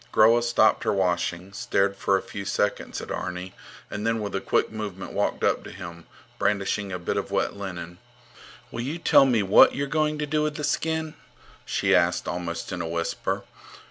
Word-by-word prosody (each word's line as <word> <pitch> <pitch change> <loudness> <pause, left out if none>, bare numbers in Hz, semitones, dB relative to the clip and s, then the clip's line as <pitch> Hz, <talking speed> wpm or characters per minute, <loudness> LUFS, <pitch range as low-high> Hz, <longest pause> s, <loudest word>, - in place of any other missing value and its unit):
Groa 115 +2 +6
stopped 120 -2 +3
her - - +1
washing, 90 -1 -1
stared 100 0 +1
for 100 0 +2
a - - -5
few 100 - -6
seconds 100 +1 -1
at - - -8
Arni, 90 0 -4 0.3
and 105 - -5
then 115 0 +1
with 105 -1 -4
a 95 - -1
quick - - +1
movement 105 -4 -6
walked - - -1
up - - +2
to - - -9
him, 85 -1 -9 0.3
brandishing 100 0 0
a 90 - -2
bit 85 - -2
of - - -2
wet - - 0
linen. 90 -3 -7 0.7
Will 120 - -4
you 140 +7 -3
tell 140 -4 +5
me 115 -5 +2
what 95 +1 +6
you're 140 - -1
going 155 +1 0
to 150 - -1
do 150 +1 0
with 150 0 -1
the 150 - -5
skin? 160 0 -1 0.5
she - - +1
asked, - - +2
almost 85 -1 -4
in 90 - -3
a 85 - -3
whisper. 85 0 -2
100 Hz, 195 wpm, -25 LUFS, 90-120 Hz, 0.7 s, Groa